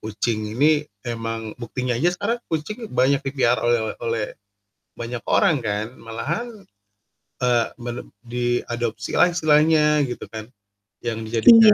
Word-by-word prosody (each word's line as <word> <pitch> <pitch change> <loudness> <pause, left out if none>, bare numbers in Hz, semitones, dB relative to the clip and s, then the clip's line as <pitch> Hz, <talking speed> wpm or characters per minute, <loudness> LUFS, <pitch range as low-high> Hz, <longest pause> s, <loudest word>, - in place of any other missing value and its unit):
kucing 110 0 -2
ini, 150 +1 +3 0.2
emang 115 -2 -4
buktinya 125 +1 -2
aja 120 +9 +2
sekarang 230 +5 -1
kucing 215 +9 -3
banyak 135 -2 +2
dipelihara 135 -3 +1
oleh 120 -1 +2 0.2
oleh 115 -2 -1 0.7
banyak 120 0 -5
orang 155 - +4
kan, 105 +1 -1
malahan, 140 - -3 1.0
eee, 120 -2 +3 0.2
mele 120 0 -4 0.2
diadopsilah 120 - 0
istilahnya, 150 -2 +4
gitu 120 - -6
kan, 110 -1 -7 0.6
yang 115 -1 -2
dijadikan 210 - +8
120 Hz, 120 wpm, -23 LUFS, 115-150 Hz, 1.0 s, dijadikan